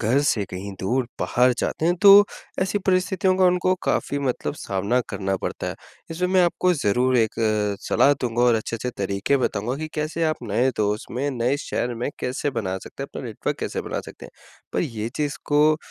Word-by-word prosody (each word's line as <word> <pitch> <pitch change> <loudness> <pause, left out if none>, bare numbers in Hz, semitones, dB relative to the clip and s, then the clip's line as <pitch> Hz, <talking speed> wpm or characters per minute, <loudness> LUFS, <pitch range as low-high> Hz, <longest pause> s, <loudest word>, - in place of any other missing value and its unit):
घर 120 +5 +2
से 105 -3 +1
कहीं 95 +2 -6
दूर 125 +7 0 0.2
बाहर 125 +1 +3
जाते 160 - -1
हैं 175 - +3
तो 200 0 +10 0.4
ऐसी 195 +2 0
परिस्थितियों 185 0 +2
का 190 - +4
उनको 180 +1 +3
काफ़ी 140 - 0
मतलब 135 +1 -2
सामना 100 +1 -1
करना 95 -1 -2
पड़ता - - -3
है। - - -3 0.4
इसमें 180 +2 -1
मैं 185 -1 +4
आपको 180 +1 +2
ज़रूर 125 0 +2
एक 110 -2 +1 0.5
सलाह 145 - +4
दूँगा 120 -1 0
और 120 -2 +5
अच्छे-अच्छे 115 +2 -3
तरीके 100 +7 0
बताऊँगा 120 0 -1
कि 155 +1 -5
कैसे 155 +2 -1
आप 155 -1 +1
नए 130 +2 +1
दोस्त 105 0 -1
में, 140 +4 -1
नए 125 +2 0
शहर 120 -4 -3
में 120 +4 -3
कैसे 130 +3 -2
बना 95 -7 -2
सकते - - -9
हैं - - -6
अपना - - -5
नेटवर्क - - -3
कैसे - - -3
बना - - -4
सकतें - - -11
हैं। - - -16 0.4
पर - - 0
ये 115 -8 -3
चीज़ 145 -1 -1
को 150 +1 +4
130 Hz, 195 wpm, -23 LUFS, 115-155 Hz, 0.5 s, तो